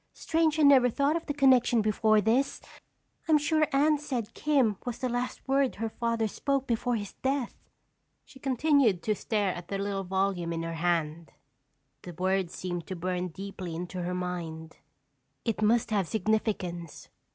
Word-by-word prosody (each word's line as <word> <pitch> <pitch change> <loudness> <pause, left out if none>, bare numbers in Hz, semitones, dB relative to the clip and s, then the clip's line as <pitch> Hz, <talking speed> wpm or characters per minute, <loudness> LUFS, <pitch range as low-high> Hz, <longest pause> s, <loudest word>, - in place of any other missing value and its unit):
"Strange 320 -1 +1
I 310 - +3
never 270 -3 +6
thought 280 +6 +1
of 335 - -4
the 290 - -1
connection 260 -4 +4
before 215 0 +3
this! 250 +7 +1 0.7
I'm 315 -2 +5
sure 310 +1 +2
Anne 295 +2 +3
said 245 -7 -4
Kim 270 -9 +2
was 245 -2 -4
the 255 - -2
last 245 +2 -3
word 270 -1 +2
her 225 +1 -3
father 230 0 -1
spoke 275 +5 -1
before 240 0 0
his 205 -3 -5
death." 265 -2 -1 0.7
She 270 - -16
continued 265 - +2
to 215 - +1
stare 205 -2 -1
at 175 0 -8
the 200 - -3
little 195 0 -2
volume 190 -2 -1
in 165 0 -3
her 165 0 -4
hand. 165 -1 -1 0.7
The 175 - -9
word 185 +1 0
seemed 175 -1 -5
to 185 - -4
burn 180 +1 -2
deeply 185 -1 -7
into 180 +2 -5
her 180 +1 -2
mind. 165 -3 -5 0.7
It 225 -3 -1
must 225 +2 +2
have 200 -5 +1
significance. 190 -6 -2
215 Hz, 165 wpm, -28 LUFS, 180-265 Hz, 0.7 s, never